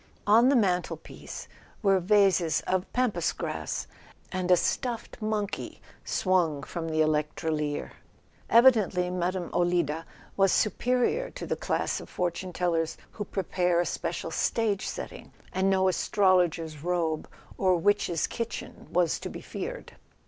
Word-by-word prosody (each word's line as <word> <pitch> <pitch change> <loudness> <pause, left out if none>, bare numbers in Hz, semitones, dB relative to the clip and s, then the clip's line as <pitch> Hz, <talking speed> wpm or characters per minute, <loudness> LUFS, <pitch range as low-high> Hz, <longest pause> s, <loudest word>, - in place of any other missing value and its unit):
On 230 +5 +6
the 280 - +4
mantelpiece 185 -6 -2 0.4
were 195 -2 +4
vases 180 -4 +3
of 185 0 -1
Pampas 250 -3 +1
grass, - - -3 0.5
and 185 -1 -2
a 180 - +7
stuffed 235 +2 -2
monkey 215 -2 -3 0.2
swung 170 -7 +1
from 165 0 -5
the 155 0 +1
electrolier. 150 -1 -1 0.6
Evidently 215 -7 +5
Mme. 180 0 -2
Olida 170 -3 +1 0.3
was 195 -1 +4
superior 250 - +1
to - - -7
the - - -1
class - - -1
of - - -11
fortune 180 +1 -2
tellers 165 -2 0
who 210 - -5
prepare 180 -2 0
a 175 - +2
special - - -3
stage 215 -4 0
setting, - - -7 0.2
and 190 +1 +2
no 190 -1 +3
astrologer's 175 -5 +2
robe 170 -3 -1 0.3
or 185 -2 +4
witch's 180 -3 +2
kitchen 235 -1 -6
was 175 -2 +1
to - - -5
be - - -7
feared. - - -6
180 Hz, 130 wpm, -28 LUFS, 170-205 Hz, 0.6 s, a